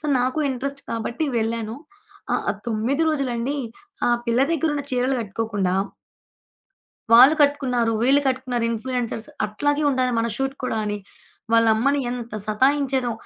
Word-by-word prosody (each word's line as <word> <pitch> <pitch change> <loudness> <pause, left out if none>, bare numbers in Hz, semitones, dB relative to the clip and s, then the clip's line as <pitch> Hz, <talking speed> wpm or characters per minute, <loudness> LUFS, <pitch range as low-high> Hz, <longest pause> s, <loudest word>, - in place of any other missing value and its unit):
So, - - -19
నాకు 255 +4 0
interest 275 +2 -4
కాబట్టి 235 +6 -2
వెళ్ళాను. 225 0 -2 0.6
ఆహ్, - - +1
ఆ - - +1
9 235 +7 0
రోజులండీ 270 -2 -1 0.5
ఆ - - +3 0.2
పిల్ల 235 +1 +2
దెగ్గరున్న 295 -2 0
చీరలు 255 +1 +1
గట్టుకోకుండా 205 -3 -2 1.4
వాళ్ళు 255 +6 +9
కట్టుకున్నారు, 250 -5 +1
వీళ్ళు 275 +3 +4
కట్టుకున్నారు 255 -2 -1
ఇన్‌ఫ్లూయెన్సర్స్ 230 -1 -3 0.2
అట్లాగే 290 +8 0
ఉండాలి 255 -1 +1
మన 230 - +1
షూట్ 270 0 -2
కూడా 225 - -1
అని, 210 0 -2 0.5
వాళ్ళ 230 0 +5
అమ్మని 280 +6 +1
ఎంత 240 -2 -6
సతాయించేదో. 260 +2 +1
250 Hz, 130 wpm, -23 LUFS, 230-275 Hz, 1.4 s, వాళ్ళు